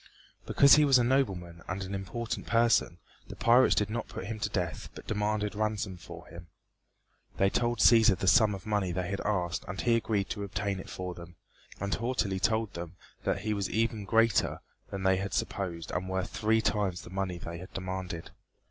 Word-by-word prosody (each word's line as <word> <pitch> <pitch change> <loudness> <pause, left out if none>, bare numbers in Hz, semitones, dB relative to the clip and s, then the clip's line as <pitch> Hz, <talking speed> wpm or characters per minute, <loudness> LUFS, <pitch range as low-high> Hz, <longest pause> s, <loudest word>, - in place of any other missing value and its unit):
Because 140 +1 +7
he 150 - +6
was 135 -3 +6
a 125 - +3
nobleman 95 -10 0
and 95 +2 -3
an 95 +1 -6
important 100 +4 -4
person 115 -6 +3 0.3
the - - -9
pirates 120 +2 +5
did 105 - +1
not 115 0 -3
put 95 - -7
him 110 +1 -5
to 105 - -1
death 90 -5 -3
but - - -10
demanded 105 -1 -1
ransom 105 -2 -2
for 85 - -11
him. 85 0 -12 0.9
They 95 0 +3
told 120 0 0
Cæsar 110 -2 +6
the 95 - -3
sum 110 -1 +5
of 95 - -10
money 105 -4 0
they 90 +1 -3
had 100 - -2
asked 90 -5 -1
and 95 +2 -6
he 120 -1 +3
agreed 110 -4 0
to 100 - -3
obtain 100 0 -3
it - - -9
for 90 -1 -5
them, 85 0 -12 0.4
and 100 0 -2
haughtily 115 -6 -1
told 110 +1 0
them 85 +1 -7 0.3
that - - 0
he 110 0 -1
was 100 -2 -2
even 110 -1 0
greater 115 0 +2 0.3
than 95 -1 -5
they 95 0 +3
had 95 +1 -3
supposed 85 -4 -3
and 95 +1 -3
worth 95 0 -2
three 110 0 +2
times 100 -5 -1
the - - -11
money 95 -2 -2
they 85 0 -7
had 90 +1 -10
demanded. 95 -3 -5
100 Hz, 200 wpm, -30 LUFS, 95-110 Hz, 0.9 s, Because